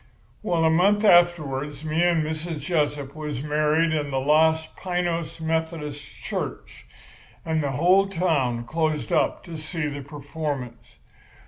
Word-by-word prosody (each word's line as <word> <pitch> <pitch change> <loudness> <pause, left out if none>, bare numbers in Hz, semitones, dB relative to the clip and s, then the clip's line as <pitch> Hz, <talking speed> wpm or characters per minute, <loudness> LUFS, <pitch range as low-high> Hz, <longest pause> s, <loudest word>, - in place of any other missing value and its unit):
"Well, 170 -6 +1
a 160 - +4
month 200 +6 +3
afterwards 155 -6 +3
me 155 +2 0
and 175 -2 +3
Mrs. 160 +1 -4
Jessup 145 -3 -1
was 150 -4 -4
married 150 +2 +2
in 150 -2 -1
the 135 - -2
Los 160 +3 +3
Piños 175 -3 -2
Methodist 160 -2 -3 0.2
Church; - - -5 0.6
and 160 -1 0
the 140 -2 -2
whole 185 +7 +4
town 150 -11 0
closed 155 +2 -1
up - - +1
to 170 -2 -8
see 155 +1 -4
the 145 -1 -4
performance. 140 -4 -6
155 Hz, 135 wpm, -24 LUFS, 145-170 Hz, 0.6 s, a